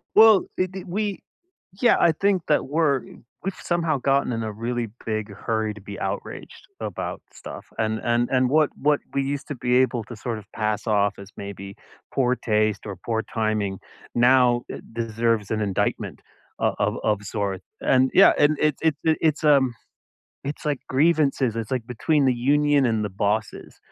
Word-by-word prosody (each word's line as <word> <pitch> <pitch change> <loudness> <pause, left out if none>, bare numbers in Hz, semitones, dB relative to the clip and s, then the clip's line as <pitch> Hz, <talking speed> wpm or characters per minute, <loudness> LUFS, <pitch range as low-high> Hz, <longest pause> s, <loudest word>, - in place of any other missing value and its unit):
Well, 220 -2 +8
d 185 - +1
d 185 0 -8
we 200 +2 -2 0.6
yeah. 245 - +5
I 170 - +5
think 195 +2 +1
that 150 - +2
we're 145 -1 +2 0.4
we've 195 - -2
somehow 165 -4 0
gotten 135 -1 +1
in 115 - -2
a 110 -1 -3
really 115 +2 -3 0.2
big 110 -1 -2
hurry 110 0 -2
to 105 - -12
be 100 0 -9
outraged - - -6
about - - -4
stuff. - - -10
And 110 0 0
and 120 0 +1
and 130 -1 +2
what 155 0 +4
what 145 0 +2
we 140 - +1
used 140 +2 -3
to 145 - -3
be 125 -1 0
able 125 -3 +2
to 120 +1 -9
sort 115 +1 -4
of 105 - -12
pass 105 0 -2
off 100 -2 +2
as 100 0 -11
maybe 100 0 -8 0.4
poor 125 -1 +2
taste 110 -3 0
or 100 -3 -5
poor 110 +4 -2
timing, 110 -3 -1 0.4
now 125 0 +4
eh - - -6
deserves 115 -2 -1
an 110 -1 0
indictment 100 -3 -1 0.4
of - - +1
of - - +1
of 105 -1 +1
sort. 100 -2 -3 0.2
And 130 0 +3
yeah. 195 - +8
And 145 +1 +4
it's 150 -2 +2
it's 155 -3 +2
it's, 160 -1 +1
um, 135 -5 +4 0.7
it's 145 - -5
like 145 -3 0
grievances. 135 -5 +2
It's 115 -1 -4
like 125 -4 -2
between 140 +4 +1
the 130 - +4
union 145 +2 +3
and 110 -2 +1
the 105 - -2
bosses. 105 +3 -2
125 Hz, 180 wpm, -24 LUFS, 110-145 Hz, 0.7 s, Well